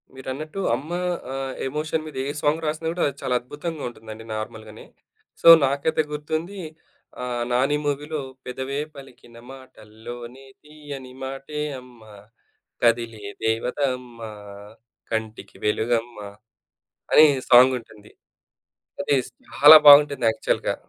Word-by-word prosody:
మీరన్నట్టు 145 +7 -6 0.2
అమ్మ 145 +7 -8 0.4
ఆహ్, 135 -1 -4
ఎమోషన్ 155 +3 -3
మీద 155 - -9
ఏ - - -3
సాంగ్ 155 +2 0
రాసినా 155 +1 -3
కూడా 175 - -1
అది 140 - -5
చాలా 125 - -1
అద్భుతంగా 145 +5 -7
ఉంటుందండి 110 -1 -11
నార్మల్‌గానే. 110 0 -8 0.6
సో, - - +2 0.2
నాకైతే 140 +4 0
గుర్తుంది 160 +6 -4 0.6
ఆహ్, 120 -1 -3
నాని 130 +4 +2
మూవీలో 150 +2 -2 0.3
పెదవే 130 +2 -4 0.2
పలికిన 125 -4 -14
మాటల్లోనే 120 0 -11 0.2
తీయని 145 -4 -10
మాటే 135 +3 -6 0.2
అమ్మ. 125 -2 -18 0.8
కదిలే 115 -2 +1 0.2
దేవతమ్మా 120 0 -2 0.8
కంటికి 110 0 -5
వెలుగమ్మ, 115 +2 -1 0.9
అనే 155 - +8 0.2
సాంగుంటుంది. 120 -4 +3 0.9
అది 165 -7 +1 0.3
చాలా 150 +2 +9
బాగుంటుంది 145 -3 +7
యాక్చువల్‌గా. - - -1
130 Hz, 105 wpm, -23 LUFS, 120-150 Hz, 0.9 s, చాలా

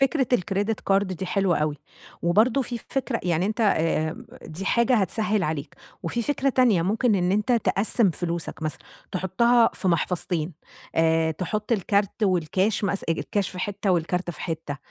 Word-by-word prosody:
فكرة 270 0 +2
الكريديت 205 0 0
كارد 195 0 +2
دي 185 +2 -5
حلوة 190 -1 +1
أوي. 150 -1 -1 0.5
وبرضو 220 +10 +3
في 240 -1 -5
فكرة 265 -3 -2
يعني 175 0 +1
أنت 215 +2 -2
آآ، 160 -6 +1 0.2
دي 165 +5 -6
حاجة 235 +5 +3
هتسهل 215 0 +1
عليك 155 -2 -3 0.3
وفي 205 +8 -2
فكرة 275 +1 0
تانية، 240 -9 +3
ممكن 215 +5 +2
إن 180 -1 +1
أنت 210 +5 +1
تقسم 220 -2 +2
فلوسك 170 -1 -4
مثلًا، 155 - -2 0.3
تحطها 225 +6 +3
في 190 - -2
محفظتين 175 -1 0 0.4
آآ، 160 0 +3
تحط 205 +7 -3
الكارت 200 +1 0
والكاش 190 +3 +1
مث 200 0 -1
الكاش 185 +4 -1
في 180 - -9
حتة 200 +1 -2
والكارت 180 +1 0
في - - -10
حتة 160 -4 -4
195 Hz, 155 wpm, -25 LUFS, 170-220 Hz, 0.5 s, وبرضو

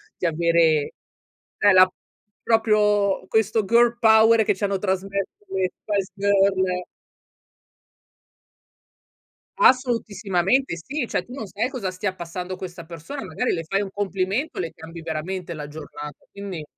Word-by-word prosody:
di - - -4
avere 165 -2 +2 0.6
e 205 - +5
la 185 0 +7 0.5
proprio 210 -3 +2
questo 220 0 +1
girl 235 +2 +4
power 220 0 +6
che - - +2
ci 190 - -7
hanno 200 -1 +1
trasmesso 195 0 -1 0.2
le 190 -1 0
Spice 200 -3 -1
Girls. 195 -2 +2 2.7
Assolutissimamente 230 - +2
sì, 265 - -3
cioè - - -1
tu 245 - -11
non 265 -5 -5
sai 215 +7 -2
cosa 235 -9 -4
stia 185 +1 -3
passando 180 +1 -6
questa 175 -2 -8
persona, 170 - -7
magari 250 - -1
le 165 - -2
fai 195 +4 0
un 200 - -4
complimento, 200 +8 -2
le 165 -3 -3
cambi 165 +1 -10
veramente 170 +3 -4
la 150 -2 -6
giornata. 150 -1 -9
Quindi 195 -5 -6
195 Hz, 130 wpm, -23 LUFS, 175-220 Hz, 2.7 s, la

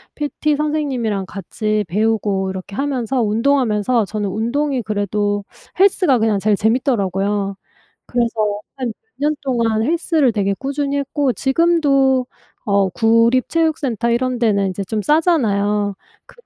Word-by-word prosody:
PT 300 0 -1
선생님이랑 270 -10 -1
같이 210 +3 -2
배우고 205 -1 0
이렇게 190 +1 -8
하면서 265 -2 -1
운동하면서 230 0 +1
저는 205 0 -3
운동이 250 +6 -1
그래도 205 0 -1 0.4
헬스가 370 - +4
그냥 220 -2 +2
제일 210 +1 +2
재밌더라고요. 205 -4 0 0.5
그래서 225 -4 0 0.2
한 255 -4 -3
몇 445 - -21
년 305 0 +1
동안 230 -4 0
헬스를 320 -2 +2
되게 200 -2 0
꾸준히 280 +3 -2
했고 280 -1 0
지금도 275 -2 +2 0.4
어 200 -2 +2
구립 230 +5 +3
체육센터 295 -8 0
이런 245 +1 0
데는 200 -4 +2
인제 190 +2 -4
좀 210 +2 -3
싸잖아요. 210 - +2 0.3
그런 485 - -20
230 Hz, 310 characters per minute, -19 LUFS, 205-280 Hz, 0.5 s, 헬스가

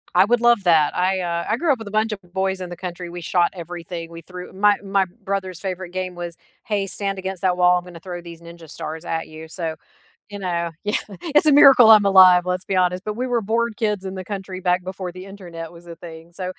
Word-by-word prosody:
I - - +6
would 240 +2 +1
love 240 -4 +4
that. 160 -4 +3
I, 185 +1 +1
uh 170 -1 -2
I 215 - +1
grew 320 +3 +1
up 260 - 0
with 225 - -8
a - - -7
bunch 215 +1 +1
of 210 - -4
boys 190 0 -1
in 180 - -5
the 175 - -8
country, 175 -1 -6
we 175 0 -7
shot 175 +1 +1
everything, 170 -1 -7
we 165 0 -10
threw 180 +2 -10
my 205 +2 +4
my 195 -1 +1 0.2
brother's 190 -3 -3
favorite 185 -1 -5
game 185 0 -4
was 175 -1 -7 0.3
“Hey, 205 -4 -1
stand 195 0 -3
against 190 -1 -5
that 180 -2 +1
wall, 180 0 +5
I'm 175 - -4
gonna 175 -2 -11
throw 175 -1 -7
these 170 -1 -11
ninja 170 -1 -13
stars 160 +3 -7
at 160 0 -3
you,” 155 +1 -10
so, 165 -1 -4 0.5
you 205 0 -7
know 170 -3 -2
Yeah, 210 0 0 0.4
it’s 300 - +6
a 305 - +5
miracle 265 -5 +8
I’m 210 -1 +3
alive, 185 -2 +8
let's 180 0 -3
be - - +2
honest, 180 +1 -1
but 210 0 -3
we 255 - -1
were 235 -1 +2
bored 235 -1 +1
kids 210 -3 0
in 190 - -8
the 185 -1 -6
country 190 -1 -6
back 180 0 +1
before 185 0 -6
the 185 +1 -10
internet 170 -4 -9
was 170 0 -15
a 170 - -9
thing, 160 -1 -10 0.2
so 185 - -3
185 Hz, 250 wpm, -21 LUFS, 175-195 Hz, 0.5 s, miracle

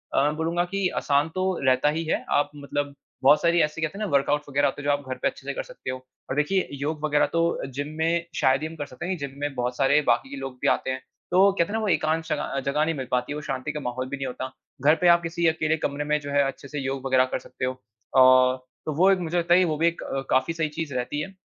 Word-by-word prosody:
अ, 140 +2 +4
बोलूँगा 170 +2 0
कि 195 -2 +1
आसान 145 +2 +2
तो 185 0 0 0.2
रहता 130 +2 +4
ही 160 +2 -1
है। 155 - -1
आप 145 - +2
मतलब 145 0 -3 0.3
बहुत 145 +3 +6
सारी, 170 +1 +3
ऐसी 150 +1 -1
कहते 160 +5 -2
हैं 215 - -2
ना, - - -5
वर्कआउट 140 +1 +2
वग़ैरह 145 +1 +2
होते 140 +1 -4
हैं, - - -9
जो 145 - +3
आप 145 -2 -4
घर 130 - -3
पे - - +2
अच्छे - - -6
से - - -1
कर - - -4
सकते - - -9
हो 130 - -2 0.3
और - - -2
देखिए, 150 +6 +1
योग 150 +2 -4
वग़ैरह 150 -1 +3
तो 165 - +2 0.3
जिम 145 +2 -3
में 170 +1 +1
शायद 130 +1 +3
ही 155 - -2
हम 160 - -10
कर 145 -2 -4
सकते 130 +4 -8
हैं 185 0 -2
क्योंकि 140 -3 -6
जिम 140 - -14
में 145 -1 -2
बहुत 125 0 -2
सारे 140 +2 +4
बाकी 120 +3 +2
के 140 - -6
लोग 135 -1 -6
भी - - +1
आते - - +1
हैं, 130 - -3 0.3
तो 195 +2 +6
कहते 170 -4 +1
हैं - - -5
ना, 225 - 0
वो 215 - -1
एकांत 160 -2 +1
शग - - -1
अ, 140 - -3
जगह 150 +2 +1
नहीं 165 0 -1
मिल 130 -3 -5
पाती, 125 +3 0
वो 150 - -5
शांति 135 0 -3
का 150 - -4
माहौल 130 -1 -4
भी 140 - -4
नही 135 - -3
होता। 130 0 -5 0.3
घर 150 +2 +7
पे 180 - +4
आप 170 0 +6
किसी 170 0 0
अकेले 160 0 +1
कमरे 145 -1 -2
में 150 0 +1
जो 145 -1 -7
है, 140 0 +4
अच्छे 135 +1 -5
से 145 +1 -5
योग 135 0 -3
वग़ैरह 130 -1 +4
कर - - 0
सकते 130 - -5
हो 130 0 -3 0.4
और 130 0 +6 0.3
तो 155 - -2
वो 185 +5 +5
एक 190 - +2
मुझे 175 0 -2
लगता 170 0 +3
है 180 - +7
कि 185 - +4
वो 155 -3 0
भी 165 +2 +3
एक 170 - -1 0.3
काफ़ी 130 +5 +2
सही 160 -2 -1
चीज़ 150 -2 -5
रहती 125 +4 -2
है। 190 +6 -6
150 Hz, 290 wpm, -25 LUFS, 135-165 Hz, 0.4 s, घर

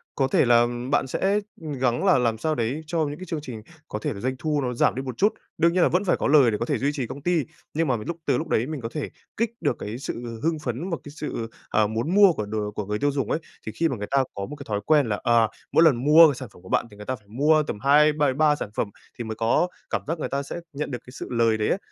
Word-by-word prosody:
có 135 - +2
thể - - +3
là 120 0 +5 0.3
bạn 145 - +2
sẽ 195 +9 +1 0.2
gắng 135 -3 -1
là 190 - +5
làm 115 -3 +1
sao 155 +7 -1
đấy 120 +6 -1
cho 165 +1 -1
những 145 - -6
cái 185 - -8
chương 165 -4 -4
trình 125 -6 -7 0.3
có - - -4
thể 150 -3 -2
là 100 - -8
doanh 130 +4 -2
thu 150 -2 0
nó 125 -2 -2
giảm 120 - +2
đi 130 - -2
một 130 -3 -6
chút, 205 +2 +3 0.2
đương 170 +1 +3
nhiên 180 -1 +3
là - - +4
vẫn 180 +3 +1
phải 180 - +2
có - - -1
lời 140 -5 +6
để 105 - -1
có 115 - -2
thể - - 0
duy 140 +2 0
trì 135 -5 -3
công 140 - -8
ty, 170 0 +1 0.3
nhưng 160 +1 0
mà 130 -3 +1
mà 105 - -7
lúc 170 - -3
từ - - +2
lúc 165 - -3
đấy 115 -6 +1
mình 155 -3 -5
có 115 - -4
thể 150 +1 -4 0.3
kích 230 0 0
được 145 -7 +1
cái 105 +3 -5
sự 120 -3 -6
hưng 160 -1 +1
phấn, 130 +8 -3
một 165 - -1
cái 145 - -10
sự, 115 -7 -4 0.2
ờ, 110 -1 +3
muốn 115 - -2
mua 200 -3 +7
của 105 -8 -3
đồ 105 0 -3
của 105 0 -4
người 105 +1 -2
tiêu 145 0 +2
dùng 135 -1 -2
ấy. - - +1 0.3
Thì 110 - -4
khi 165 - +2
mà 135 - -2
người 105 0 -5
ta 140 -1 +4
có 100 - -4
một 150 - -8
cái 140 -1 -10
thói 105 -1 0
quen 150 -3 +4
là, 105 - -1
à, 115 -1 +4 0.2
mỗi 165 - +5
lần 160 -6 +6
mua 155 +1 +8
sản 130 -2 -8
phẩm - - -17
của 95 - -14
bạn - - +2
thì 105 - -14
người 105 - -9
ta 130 - -2
phải 105 -4 -21
mua 150 +8 +3
tầm 105 - -5
hai, 150 +4 +5
b 150 - -7 0.2
ba 150 -1 +4
sản 125 - -5
phẩm 105 - -1 0.3
thì 120 - -4
mới 110 -1 -5
có 115 +10 +2 0.2
cảm - - -1
giác 165 +2 -2
người - - -3
ta 140 +1 -1
sẽ 140 - -7 0.2
nhận 145 +1 -4
được 125 - -3
cái 125 - -12
sự 130 - -7
lời 115 -2 +2
đấy 105 - 0
ấy. - - +2
135 Hz, 310 wpm, -25 LUFS, 115-155 Hz, 0.3 s, mua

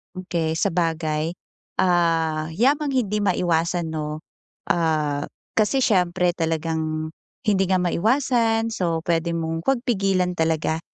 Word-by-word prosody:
Okey. 170 -3 -2
Sabagay, 160 -2 0 0.5
ah, 165 -3 +2
yamang 280 - +2
hindi 210 -5 0
maiwasan 175 -3 0
'no, 155 0 -4 0.5
ah, 155 -4 0 0.3
kasi 240 +5 +3
siyempre 180 -4 +2
talagang 160 -1 -2 0.4
hindi 195 -2 +3
nga 185 -1 +2
maiwasan 225 +4 +1
so, 170 -6 -1
puwede 170 0 0
mong 165 0 -3
'wag 270 -2 +3
pigilan 195 -7 +1
talaga 160 0 0
170 Hz, 110 wpm, -23 LUFS, 160-195 Hz, 0.5 s, kasi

